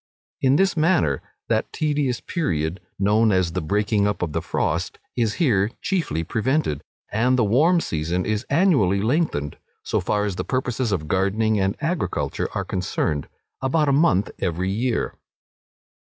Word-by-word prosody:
In 135 +1 +4
this 195 +4 +3
manner 155 - +2 0.3
that - - 0
tedious 145 -5 0
period, 85 - -2 0.2
known 105 +3 +3
as 95 -3 +2
the 90 +2 -2
breaking 105 +4 +1
up 100 -3 -1
of 80 -4 -3
the - - 0
frost, - - -1 0.2
is 115 -3 0
here 110 - +2
chiefly 180 - -1
prevented; 115 - 0 0.3
and 125 +4 +2
the 120 - +3
warm 150 - +4
season 85 - -2
is 110 0 -1
annually 135 - +3
lengthened, 115 - 0 0.2
so - - 0
far 105 0 0
as 100 -3 -3
the - - -1
purposes 130 -2 -1
of 80 -6 -1
gardening 100 +5 +1
and 95 0 0
agriculture 160 - -1
are - - -1
concerned, 80 -5 -2 0.3
about 145 +3 +2
a - - +3
month 110 - +3
every 90 +1 -1
year. 115 +3 -1
110 Hz, 150 wpm, -23 LUFS, 95-140 Hz, 0.3 s, In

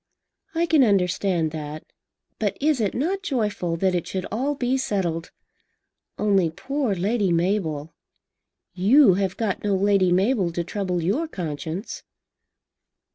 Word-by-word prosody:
"I 335 +1 +2
can 315 -4 +4
understand 185 -5 +1
that. 155 0 -6 0.6
But - - -1
is 295 -3 +2
it 205 - -1
not 360 +10 -1
joyful 210 - -1
that 185 +1 +1
it 175 -2 -1
should 185 -1 -3
all 265 +7 -1
be 255 -1 0
settled? 185 -10 -2 0.9
Only 195 -5 +2
poor 265 - -2
Lady 200 +1 0
Mabel! 165 -4 -1 0.8
You 205 - +5
have 195 -2 -1
got 220 -4 -2
no 205 -1 +1
Lady 195 -1 +3
Mabel 190 0 +2
to 170 - -1
trouble 180 -1 -2
your 240 - 0
conscience." 165 - -5
195 Hz, 130 wpm, -24 LUFS, 175-240 Hz, 0.9 s, You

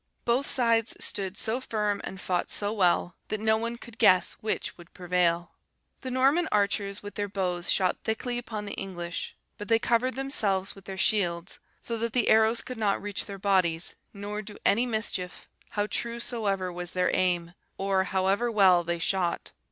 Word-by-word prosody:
Both 245 +4 +2
sides 230 -3 +3
stood 195 0 -2
so 230 +4 -1
firm 210 -4 -1
and 190 - -6
fought 180 -1 -1
so 205 +1 +1
well, 180 -3 +2
that 215 - -2
no 220 0 +3
one 230 +2 -3
could 235 -2 -13
guess 185 0 +5
which 215 - -2
would 175 0 -16
prevail. 175 -1 +1 0.5
The 260 - -5
Norman 275 +7 +3
archers 200 -1 0
with 205 - -7
their 205 0 -3
bows 180 -3 0
shot 185 -2 +2
thickly 240 +2 -2
upon 215 -3 -6
the 205 - -5
English; 175 -3 -5 0.2
but 205 - -6
they 225 - +5
covered 240 +3 +1
themselves 205 -8 0
with 195 -2 -15
their 190 0 -6
shields, 180 -4 0 0.2
so 230 -1 -3
that 230 0 -2
the 245 -3 +2
arrows 220 +1 +4
could 255 -3 -7
not 205 -2 +1
reach 205 -3 -4
their 200 -1 -6
bodies, 185 -4 +1 0.2
nor 205 +1 -5
do 210 0 -10
any 235 +5 +3
mischief, 215 -6 -3 0.2
how 205 -1 -1
true 235 +2 -2
soever 200 -7 -1
was 175 0 -4
their 180 0 +1
aim, 175 -2 +1 0.2
or 195 -1 +1
however 195 +5 +1
well 190 -5 +5
they 170 0 -1
shot. 175 0 -1
205 Hz, 180 wpm, -28 LUFS, 185-225 Hz, 0.5 s, guess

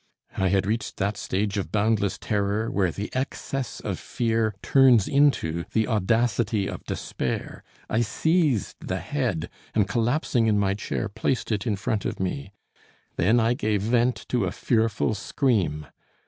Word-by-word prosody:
I 95 - +1
had 95 +1 +2
reached 110 +3 -2
that 100 +2 0
stage 100 +1 -1
of 95 - -4
boundless 105 -2 +1
terror 105 +1 -1
where 95 -3 +2
the 100 +5 -5
excess 130 -1 -3
of - - -4
fear 115 -3 0
turns 125 -4 +5
into 135 - +2
the 110 -1 +2
audacity 110 -1 +1
of - - -6
despair. - - -4 0.2
I 110 - +1
seized 150 - +1
the 95 - -1
head 100 - -2 0.3
and 105 -3 +3
collapsing 120 +2 +1
in 105 -1 +3
my 100 -1 +2
chair, 105 +2 -3
placed 110 +4 -2
it 105 +2 -1
in 105 - +1
front 105 +1 -2
of - - -3
me. 90 -7 -3 0.6
Then 110 +7 +3
I 115 +1 +3
gave 105 -4 0
vent 120 +2 +1
to 120 -6 +1
a 90 - -1
fearful 110 0 +1
scream. 100 - 0
110 Hz, 155 wpm, -25 LUFS, 100-120 Hz, 0.6 s, turns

